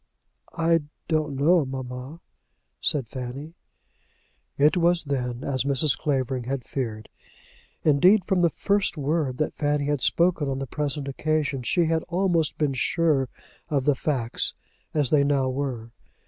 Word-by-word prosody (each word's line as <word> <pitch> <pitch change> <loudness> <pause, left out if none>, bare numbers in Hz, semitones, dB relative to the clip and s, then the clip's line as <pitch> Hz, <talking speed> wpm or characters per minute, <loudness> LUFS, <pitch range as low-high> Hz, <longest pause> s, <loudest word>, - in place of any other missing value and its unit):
"I 165 0 +3 0.3
don't 155 -3 0
know, 160 +5 +4
mamma," 130 +3 -6 0.6
said 135 -6 0
Fanny. 130 +6 -7 1.0
It 150 +4 +4
was 175 -1 +3
then 125 -3 -3
as 130 -3 0
Mrs. 140 +1 +2
Clavering 130 -4 -1
had 130 -1 -3
feared. 110 -5 -4 0.8
Indeed 180 +7 +5
from 190 -3 +1
the 170 - +4
first 200 +3 0
word 145 -2 -1
that 155 - -1
Fanny 145 -1 0
had 145 -2 0
spoken 170 0 +2
on 135 - -2
the 135 - -3
present 145 +1 -3
occasion, 150 -1 -1
she 170 +8 +2
had 160 0 +1
almost 175 -3 +1
been 150 -3 +1
sure 140 -1 +1 0.4
of 140 -4 0
the 145 - +4
facts, 130 -4 -1 0.4
as 145 -5 +1
they 145 -2 +5
now 140 -2 +1
were. 130 -4 -4
145 Hz, 145 wpm, -25 LUFS, 130-160 Hz, 1.0 s, Indeed